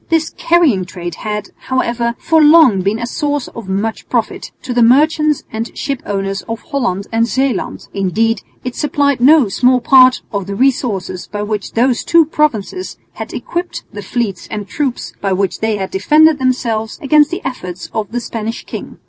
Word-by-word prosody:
This 325 Hz, -1 st, +1 dB
carrying 325 Hz, -, +2 dB
trade 175 Hz, -1 st, -6 dB
had, 210 Hz, -1 st, -5 dB, 0.2 s
however, 235 Hz, -2 st, 0 dB
for 320 Hz, -1 st, +2 dB
long 295 Hz, -, +6 dB
been 200 Hz, +4 st, 0 dB
a 235 Hz, -, -3 dB
source 290 Hz, +2 st, -2 dB
of 230 Hz, -5 st, -9 dB
much 205 Hz, +4 st, -3 dB
profit -, -, -2 dB
to 250 Hz, -, -3 dB
the 240 Hz, -, +2 dB
merchants 300 Hz, +5 st, +3 dB
and 225 Hz, +1 st, -2 dB
shipowners 195 Hz, -8 st, -3 dB
of 225 Hz, 0 st, -3 dB
Holland 200 Hz, -, -2 dB
and 230 Hz, +1 st, +2 dB
Zeeland; 265 Hz, -3 st, -2 dB
indeed 205 Hz, +3 st, 0 dB, 0.2 s
it 250 Hz, -1 st, -5 dB
supplied 285 Hz, -3 st, 0 dB
no 285 Hz, -1 st, +6 dB
small 250 Hz, +6 st, +3 dB
part 255 Hz, +1 st, +5 dB
of 200 Hz, -2 st, -3 dB
the 200 Hz, -, -4 dB
resources 225 Hz, -7 st, -1 dB
by 205 Hz, 0 st, -4 dB
which 210 Hz, -1 st, -4 dB
those 240 Hz, +1 st, +1 dB
two 335 Hz, -1 st, +4 dB
provinces 300 Hz, -, -1 dB, 0.2 s
had -, -, -7 dB
equipped 350 Hz, +1 st, -4 dB
the 205 Hz, -, -6 dB
fleets 200 Hz, -2 st, -3 dB
and 210 Hz, -2 st, -5 dB
troops 270 Hz, 0 st, -3 dB
by 195 Hz, -1 st, 0 dB
which 190 Hz, 0 st, -1 dB
they 220 Hz, -1 st, 0 dB
had 190 Hz, -2 st, -4 dB
defended 300 Hz, +10 st, +4 dB
themselves 230 Hz, -4 st, -1 dB
against 295 Hz, +1 st, +4 dB
the 350 Hz, -, -5 dB
efforts 180 Hz, -9 st, -5 dB
of 220 Hz, -2 st, -3 dB
the 245 Hz, -, -1 dB
Spanish 225 Hz, -1 st, -5 dB
king. -, -, -8 dB
235 Hz, 175 wpm, -16 LUFS, 205-280 Hz, 0.2 s, long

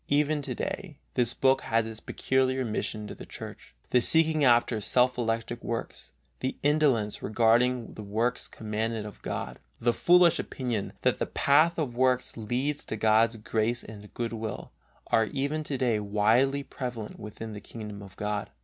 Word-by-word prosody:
Even 150 Hz, +1 st, +2 dB
to 130 Hz, -3 st, -4 dB
day 160 Hz, +2 st, -5 dB, 0.2 s
this 120 Hz, -2 st, +1 dB
book 135 Hz, 0 st, +3 dB
has 115 Hz, 0 st, +1 dB
its 110 Hz, -1 st, -6 dB
peculiar 130 Hz, +1 st, 0 dB
mission 110 Hz, -1 st, -3 dB
to -, -, -7 dB
the -, -, -10 dB
Church. -, -, -10 dB, 0.2 s
The 125 Hz, -, +5 dB
seeking 160 Hz, +1 st, +4 dB
after 120 Hz, -3 st, +4 dB
self 125 Hz, +4 st, +3 dB
elected 115 Hz, -2 st, -2 dB
works, 65 Hz, -, -5 dB, 0.3 s
the 130 Hz, -, -3 dB
indolence 140 Hz, -8 st, +2 dB
regarding 120 Hz, +2 st, +2 dB
the -, -, -8 dB
works 110 Hz, +4 st, -1 dB
commanded 110 Hz, 0 st, -3 dB
of 105 Hz, -, -10 dB
God, -, -, -5 dB, 0.2 s
the 120 Hz, 0 st, +2 dB
foolish 175 Hz, +2 st, +5 dB
opinion, 120 Hz, -6 st, -3 dB
that -, -, +2 dB
the -, -, -1 dB
path 155 Hz, +4 st, +3 dB
of 140 Hz, -7 st, -2 dB
works 125 Hz, 0 st, +1 dB
leads 125 Hz, +6 st, -2 dB
to -, -, -4 dB
God's 110 Hz, +2 st, +3 dB
grace 110 Hz, +3 st, -1 dB
and 105 Hz, -1 st, -11 dB
good 115 Hz, -1 st, -2 dB
will, 110 Hz, -1 st, -5 dB, 0.3 s
are 110 Hz, -, +3 dB
even 140 Hz, +6 st, -2 dB
to 140 Hz, -, -2 dB
day 120 Hz, -4 st, +1 dB
widely 110 Hz, +7 st, +2 dB
prevalent 120 Hz, -6 st, -6 dB
within 110 Hz, +1 st, -7 dB
the 105 Hz, -, -7 dB
kingdom 105 Hz, -3 st, -8 dB
of 100 Hz, -2 st, -12 dB
God. 105 Hz, 0 st, -3 dB
120 Hz, 165 wpm, -28 LUFS, 110-135 Hz, 0.3 s, The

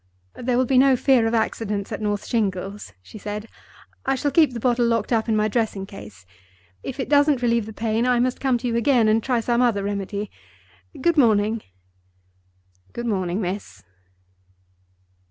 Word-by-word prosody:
"There 245 Hz, 0 st, -1 dB
will 255 Hz, -, +3 dB
be 255 Hz, +1 st, +3 dB
no 270 Hz, 0 st, +5 dB
fear 250 Hz, -2 st, +3 dB
of 230 Hz, -, 0 dB
accidents 210 Hz, -2 st, -2 dB
at 215 Hz, -, -4 dB
North 205 Hz, -1 st, -2 dB
Shingles," 200 Hz, -2 st, -2 dB
she 215 Hz, -, -12 dB
said. 210 Hz, +2 st, -5 dB, 0.6 s
"I 270 Hz, -, +1 dB
shall 285 Hz, +2 st, -1 dB
keep 315 Hz, -4 st, +4 dB
the 240 Hz, -, -5 dB
bottle 240 Hz, 0 st, +2 dB
locked 230 Hz, 0 st, 0 dB
up 225 Hz, 0 st, 0 dB
in 220 Hz, -, +2 dB
my 215 Hz, 0 st, +2 dB
dressing 215 Hz, -3 st, -1 dB
case. 105 Hz, -, -12 dB, 0.6 s
If 270 Hz, +1 st, -7 dB
it 265 Hz, -, -2 dB
doesn't 285 Hz, -3 st, +3 dB
relieve 235 Hz, -2 st, +1 dB
the -, -, -7 dB
pain, 225 Hz, +2 st, -1 dB
I 250 Hz, -1 st, +3 dB
must 255 Hz, +1 st, 0 dB
come 265 Hz, -3 st, +1 dB
to 245 Hz, +1 st, -4 dB
you 235 Hz, -, -1 dB
again, 235 Hz, -1 st, +3 dB
and 220 Hz, +1 st, +3 dB
try 245 Hz, 0 st, 0 dB
some 240 Hz, +1 st, +1 dB
other 225 Hz, -5 st, +2 dB
remedy. 200 Hz, 0 st, -4 dB, 0.7 s
Good 335 Hz, +4 st, +1 dB
morning." 220 Hz, -3 st, +3 dB, 1.3 s
"Good 240 Hz, -, -5 dB
morning, 190 Hz, -3 st, -1 dB
miss." 175 Hz, -, -5 dB
230 Hz, 175 wpm, -23 LUFS, 205-250 Hz, 1.3 s, no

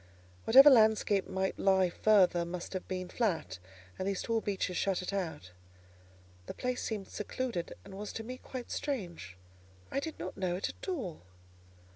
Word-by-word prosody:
Whatever 270 Hz, +5 st, +9 dB
landscape 215 Hz, -4 st, +4 dB
might 190 Hz, 0 st, -2 dB
lie 190 Hz, -2 st, +3 dB
further 185 Hz, -4 st, +4 dB
must 175 Hz, +2 st, -6 dB
have 185 Hz, -, -4 dB
been 185 Hz, -1 st, -3 dB
flat, 165 Hz, -, -1 dB, 0.4 s
and 185 Hz, -, -2 dB
these 195 Hz, -1 st, -1 dB
tall 230 Hz, -1 st, 0 dB
beeches 190 Hz, -3 st, -2 dB
shut 190 Hz, 0 st, 0 dB
it 185 Hz, -, -4 dB
out. 160 Hz, -, -4 dB, 1.0 s
The -, -, -6 dB
place 250 Hz, 0 st, -2 dB
seemed 210 Hz, -4 st, -3 dB
secluded, 215 Hz, -4 st, -4 dB
and -, -, -11 dB
was 205 Hz, +2 st, -6 dB
to 225 Hz, -, -5 dB
me 255 Hz, +3 st, -7 dB
quite 255 Hz, -2 st, -8 dB
strange: 175 Hz, -, -4 dB, 0.5 s
I -, -, 0 dB
did 320 Hz, +2 st, -5 dB
not 180 Hz, +2 st, -6 dB
know 185 Hz, -2 st, -1 dB
it 185 Hz, -, -2 dB
at -, -, -10 dB
all. 245 Hz, -, -4 dB
195 Hz, 165 wpm, -32 LUFS, 180-225 Hz, 1.0 s, Whatever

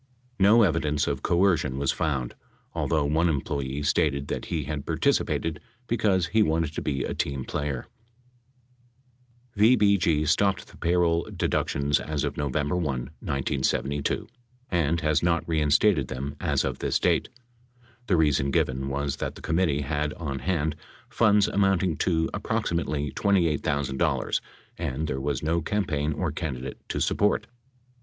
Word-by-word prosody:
No 105 Hz, +4 st, +6 dB
evidence 75 Hz, -5 st, +1 dB
of 70 Hz, -2 st, -2 dB
coercion 85 Hz, -7 st, +2 dB
was 70 Hz, -1 st, +1 dB
found, 70 Hz, -6 st, -2 dB, 0.4 s
although 75 Hz, -3 st, 0 dB
one 80 Hz, +4 st, +2 dB
em 75 Hz, -4 st, +1 dB
ployee 70 Hz, +1 st, -3 dB
stated 70 Hz, -1 st, +1 dB
that -, -, -3 dB
he 80 Hz, -3 st, -2 dB
had 75 Hz, 0 st, -4 dB
participated 80 Hz, -2 st, 0 dB, 0.3 s
because 105 Hz, -7 st, +1 dB
he 110 Hz, +6 st, +2 dB
wanted 80 Hz, -4 st, +1 dB
to -, -, -3 dB
be 70 Hz, -3 st, -1 dB
a -, -, -3 dB
team 70 Hz, -2 st, -2 dB
player. 70 Hz, -3 st, -3 dB, 1.7 s
VBG 100 Hz, -8 st, +4 dB
stopped 95 Hz, +3 st, +2 dB
the -, -, -16 dB
payroll 85 Hz, -1 st, +1 dB
deductions 70 Hz, +1 st, 0 dB
as 75 Hz, -2 st, -3 dB
of -, -, -2 dB
November 75 Hz, +2 st, -1 dB
1, 90 Hz, -, 0 dB
1972, 70 Hz, 0 st, -2 dB, 0.5 s
and 85 Hz, -2 st, +1 dB
has 75 Hz, -1 st, +2 dB
not 85 Hz, -1 st, +1 dB
reinstated 75 Hz, 0 st, +3 dB
them 70 Hz, +2 st, -5 dB
as -, -, +1 dB
of -, -, -3 dB
this -, -, +1 dB
date. -, -, +1 dB, 0.8 s
The 90 Hz, -, +3 dB
reason 75 Hz, -3 st, +2 dB
given 65 Hz, 0 st, 0 dB
was 70 Hz, +1 st, -2 dB
that -, -, -4 dB
the -, -, -11 dB
committee 80 Hz, -3 st, +1 dB
had 75 Hz, +1 st, -2 dB
on 70 Hz, -5 st, -4 dB
hand 80 Hz, -1 st, -1 dB, 0.3 s
funds 105 Hz, -1 st, +4 dB
amounting 95 Hz, -3 st, +2 dB
to 80 Hz, -2 st, +1 dB
approximately 75 Hz, -4 st, -1 dB
$28,000, 75 Hz, -8 st, +1 dB, 0.4 s
and 70 Hz, +5 st, -2 dB
there 65 Hz, -3 st, -3 dB
was 70 Hz, -1 st, -2 dB
no 85 Hz, +2 st, +1 dB
campaign 80 Hz, -5 st, -1 dB
or 90 Hz, +1 st, -2 dB
candidate 70 Hz, -5 st, -5 dB
to -, -, -2 dB
support. 105 Hz, +1 st, +1 dB
75 Hz, 140 wpm, -26 LUFS, 70-85 Hz, 1.7 s, No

